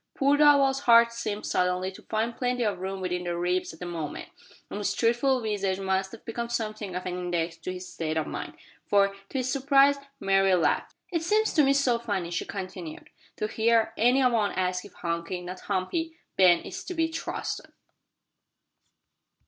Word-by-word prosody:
Poor 280 Hz, 0 st, +3 dB
Darvall's 285 Hz, -2 st, +5 dB
heart 235 Hz, 0 st, +7 dB
seemed 215 Hz, -3 st, -4 dB
suddenly 180 Hz, +1 st, 0 dB
to 190 Hz, -, -13 dB
find 225 Hz, +2 st, -2 dB
plenty 250 Hz, -1 st, -1 dB
of 205 Hz, -4 st, -1 dB
room 190 Hz, +1 st, -4 dB
within 180 Hz, -1 st, -2 dB
the 175 Hz, -1 st, -2 dB
ribs 180 Hz, +1 st, 0 dB
at 160 Hz, -, -14 dB
that 180 Hz, -, -5 dB
moment, 165 Hz, -4 st, -5 dB, 0.4 s
and -, -, -6 dB
his 205 Hz, -1 st, -1 dB
truthful 240 Hz, +4 st, +2 dB
visage 200 Hz, -3 st, -1 dB
must 190 Hz, 0 st, -1 dB
have 230 Hz, -, -12 dB
become 235 Hz, +1 st, -4 dB
something 215 Hz, -5 st, -3 dB
of 180 Hz, -, -4 dB
an 180 Hz, -, -3 dB
index 175 Hz, -2 st, -2 dB
to 165 Hz, +3 st, -5 dB
his 185 Hz, 0 st, -7 dB
state 160 Hz, -3 st, -3 dB
of 155 Hz, -, 0 dB
mind; -, -, -6 dB, 0.3 s
for, 200 Hz, -1 st, +4 dB, 0.2 s
to -, -, -4 dB
his 255 Hz, 0 st, -1 dB
surprise, 275 Hz, 0 st, +4 dB, 0.2 s
Mary 195 Hz, -1 st, +3 dB
laughed. 165 Hz, -4 st, 0 dB, 0.2 s
"It 335 Hz, -3 st, 0 dB
seems 425 Hz, +6 st, +2 dB
to 305 Hz, -, +5 dB
me 275 Hz, 0 st, +4 dB
so 260 Hz, -4 st, +2 dB
funny," 195 Hz, -7 st, -3 dB
she 175 Hz, -, -2 dB
continued, 185 Hz, -4 st, -7 dB, 0.2 s
"to -, -, -2 dB
hear 225 Hz, 0 st, +2 dB
any 255 Hz, +3 st, +4 dB
one 230 Hz, -5 st, +2 dB
ask 180 Hz, -1 st, -1 dB
if 205 Hz, -, -13 dB
Hunky 170 Hz, +1 st, -3 dB
not 180 Hz, +1 st, -7 dB
Humpy 320 Hz, -, -2 dB, 0.2 s
Ben 180 Hz, -3 st, +5 dB
is -, -, -7 dB
to 360 Hz, -, -5 dB
be 325 Hz, 0 st, +2 dB
trusted." 325 Hz, 0 st, -5 dB
205 Hz, 185 wpm, -27 LUFS, 180-245 Hz, 0.4 s, heart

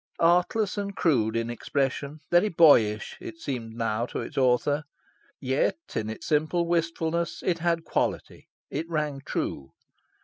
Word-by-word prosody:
Artless 180 Hz, +5 st, +2 dB
and 200 Hz, -1 st, -4 dB
crude 115 Hz, -9 st, +2 dB
in 115 Hz, +1 st, -1 dB
expression, 140 Hz, +4 st, -2 dB
very 175 Hz, +5 st, +5 dB
boyish, 115 Hz, -, +4 dB
it 165 Hz, -, -8 dB
seemed 120 Hz, -8 st, -5 dB
now 115 Hz, 0 st, -1 dB
to -, -, -5 dB
its -, -, -8 dB
author. 135 Hz, +3 st, +2 dB, 0.6 s
Yet, 130 Hz, -, +1 dB, 0.2 s
in 110 Hz, 0 st, -1 dB
its 110 Hz, -, -7 dB
simple 155 Hz, +3 st, +1 dB
wistfulness, 170 Hz, 0 st, -1 dB
it 170 Hz, -2 st, +1 dB
had 170 Hz, -1 st, 0 dB
quality: -, -, -2 dB, 0.2 s
it 160 Hz, +4 st, -3 dB
rang 150 Hz, -4 st, -2 dB
true. 65 Hz, -, -4 dB
150 Hz, 140 wpm, -27 LUFS, 120-170 Hz, 0.6 s, very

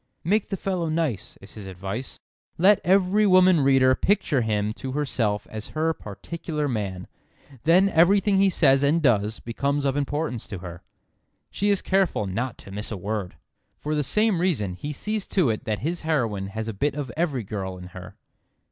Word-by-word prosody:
"Make 200 Hz, +5 st, +1 dB
the 195 Hz, -, -2 dB
fellow 180 Hz, -3 st, -2 dB
nice," 155 Hz, -, -2 dB
is 95 Hz, -, -11 dB
his 105 Hz, -3 st, -9 dB
advice. 95 Hz, +7 st, -6 dB, 0.4 s
"Let 195 Hz, +4 st, +5 dB
every 195 Hz, +3 st, +3 dB
woman 185 Hz, -2 st, +6 dB
reader 135 Hz, -1 st, +4 dB
picture 150 Hz, -4 st, +1 dB
him 105 Hz, -1 st, -1 dB
to 130 Hz, +3 st, -6 dB
herself 115 Hz, -8 st, -1 dB
as 110 Hz, 0 st, -6 dB
her 160 Hz, +1 st, +2 dB
particular 150 Hz, -, -5 dB
man. 100 Hz, -7 st, -3 dB, 0.6 s
Then 180 Hz, +4 st, +5 dB
everything 195 Hz, +3 st, +4 dB
he 195 Hz, 0 st, +4 dB
says 135 Hz, -7 st, +4 dB
and 145 Hz, +4 st, +3 dB
does 110 Hz, -7 st, +1 dB
becomes 140 Hz, +4 st, -2 dB
of 135 Hz, -1 st, +1 dB
importance 145 Hz, -3 st, -2 dB
to 100 Hz, -, -6 dB
her. 90 Hz, -1 st, -9 dB, 0.7 s
She 205 Hz, -, 0 dB
is 200 Hz, -2 st, +2 dB
careful 190 Hz, -, +1 dB
not 115 Hz, +6 st, -3 dB
to 100 Hz, -, -12 dB
miss 105 Hz, +2 st, -4 dB
a 105 Hz, -, -3 dB
word." 100 Hz, -1 st, -4 dB, 0.4 s
For 150 Hz, -, -3 dB
the 150 Hz, -1 st, +1 dB
same 210 Hz, -, +1 dB
reason 125 Hz, -, 0 dB
he 145 Hz, +11 st, -6 dB
sees 210 Hz, +7 st, -3 dB
to 170 Hz, -, +2 dB
it 110 Hz, -, -5 dB
that 110 Hz, -1 st, -1 dB
his 170 Hz, +2 st, -2 dB
heroine 115 Hz, -11 st, -1 dB
has 110 Hz, +3 st, -5 dB
a 115 Hz, -, -3 dB
bit 140 Hz, +8 st, -1 dB
of 140 Hz, -5 st, -4 dB
every 150 Hz, -8 st, -1 dB
girl 95 Hz, -2 st, -5 dB
in 90 Hz, 0 st, -10 dB
her. 90 Hz, 0 st, -11 dB
140 Hz, 185 wpm, -25 LUFS, 105-170 Hz, 0.7 s, woman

